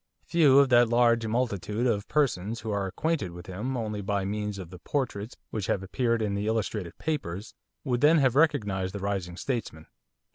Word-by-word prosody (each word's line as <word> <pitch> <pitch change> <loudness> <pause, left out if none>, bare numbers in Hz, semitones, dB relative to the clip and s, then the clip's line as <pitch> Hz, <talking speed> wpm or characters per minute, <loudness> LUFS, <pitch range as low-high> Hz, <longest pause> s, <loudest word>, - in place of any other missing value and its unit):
Few 150 -6 +5
of 140 -1 +6
that 120 -2 +5
large 115 -1 +3
multitude 110 -2 -1
of 105 -4 0
persons 115 -7 0
who 110 - -4
are 100 -1 -1
acquainted 100 - -2
with 90 0 -10
him 110 +8 -4
only 105 -3 -3
by 100 0 -1
means 105 0 -3
of 90 -3 -8
the 90 - -10
portraits 120 -3 -3
which 105 -4 -3
have 95 - 0
appeared 115 +3 0
in 105 -2 -1
the 100 +1 -2
illustrated 105 -5 -2
papers, 110 - -4 0.3
would 125 -3 -1
then 155 +3 +6
have 135 -4 +3
recognised 100 - +1
the - - -3
rising 95 -3 -3
statesman. 110 - -4
110 Hz, 185 wpm, -28 LUFS, 95-125 Hz, 0.3 s, of